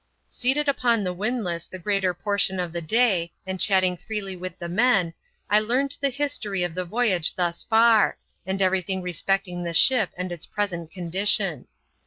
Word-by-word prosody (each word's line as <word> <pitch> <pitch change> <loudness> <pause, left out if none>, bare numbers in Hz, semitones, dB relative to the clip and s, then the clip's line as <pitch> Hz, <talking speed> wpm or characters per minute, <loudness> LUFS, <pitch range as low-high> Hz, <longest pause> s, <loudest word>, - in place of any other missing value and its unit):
Seated 275 +4 -1
upon 240 -5 +2
the 180 -1 -2
windlass 190 -4 -3
the 185 - -8
greater 190 0 0
portion 195 +1 +1
of 175 -2 -3
the 170 - -3
day, 180 -2 +2
and 190 0 -5
chatting 185 -2 +3
freely 195 +1 -5
with 185 0 -7
the 170 - -6
men, 195 -3 +2 0.3
I 210 - +4
learned 255 +6 0
the 280 - +2
history 255 -9 -2
of 175 -2 -3
the 180 +1 -3
voyage 190 -4 +1
thus 175 -2 -1
far, 225 -1 +4 0.3
and 190 +1 -1
every 190 0 +2
thing 190 +1 -4
respecting 180 +1 -2
the 170 -1 -4
ship 200 +4 +5
and 180 0 -4
its 170 -2 -7
present 175 -6 -3
condition. 180 - -1
190 Hz, 175 wpm, -24 LUFS, 175-220 Hz, 0.3 s, ship